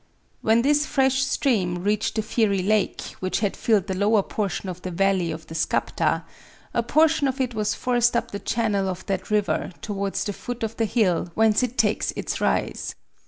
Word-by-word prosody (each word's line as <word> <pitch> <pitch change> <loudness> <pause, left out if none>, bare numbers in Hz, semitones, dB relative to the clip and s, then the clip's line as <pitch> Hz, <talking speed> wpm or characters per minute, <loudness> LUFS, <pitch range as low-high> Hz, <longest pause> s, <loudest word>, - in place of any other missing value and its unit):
When 225 +2 +3
this 295 +2 +3
fresh 265 -1 +2
stream 195 -10 0
reached 210 +2 0
the 220 - 0
fiery 210 -4 +1
lake, 210 0 +1 0.2
which 185 +2 -1
had 205 -3 0
filled 215 -5 +2
the 195 - -3
lower 205 +2 +3
portion 200 -1 -3
of 180 -1 -6
the 185 - -4
valley 185 -1 +1
of 160 -1 -6
the 160 - -10
Skapta, 160 - 0 0.5
a 235 - +2
portion 310 +4 +3
of 265 +1 -2
it 255 -2 0
was 215 -1 -1
forced 240 -1 +2
up - - -2
the 200 - -4
channel 210 -5 0
of 185 -1 -5
that 195 -2 -3
river 210 -3 0
towards 200 -2 -2
the 205 - -3
foot 245 +3 -6
of 225 0 -3
the 225 - +2
hill 195 -6 +1
whence 220 0 +4
it 250 0 -2
takes 215 -2 +1
its - - -3
rise. - - -1
215 Hz, 195 wpm, -24 LUFS, 195-240 Hz, 0.5 s, whence